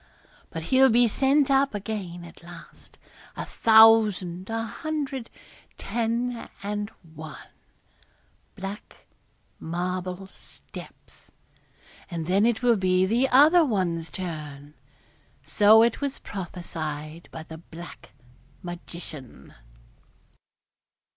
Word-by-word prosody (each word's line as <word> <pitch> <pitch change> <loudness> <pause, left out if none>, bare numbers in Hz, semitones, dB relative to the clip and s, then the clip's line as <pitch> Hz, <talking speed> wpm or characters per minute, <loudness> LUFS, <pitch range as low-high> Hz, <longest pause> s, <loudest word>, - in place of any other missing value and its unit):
But 165 - -6
he'll 265 0 +7
be 240 +1 +5
sent 275 +5 +2
up 275 -3 +3
again, 195 -4 -5
at 170 - -14
last, 170 -1 -14 0.4
a - - -4
thousand, 215 -5 +5
a 225 0 -2
hundred, 280 -1 -4 0.5
ten 235 +1 -2
and 205 +1 -3 0.2
one, 155 0 -10 1.1
black 195 +2 -8 0.5
marble 180 +2 -3
steps, 190 - -14 0.8
and 170 -3 -4
then 195 +6 +3
it 235 0 0
will 240 -2 +4
be 185 -1 +2
the 240 +7 +2
other 305 +7 +7
one's 175 - -1
turn. 150 -4 -7 0.7
So 205 +9 +6
it 235 +3 +1
was 280 -1 -2
prophesied 165 -4 -6
by 160 - -7
the 160 0 -10
black 170 +1 -12 0.5
magician.' 170 -6 -9
195 Hz, 100 wpm, -26 LUFS, 170-230 Hz, 1.1 s, he'll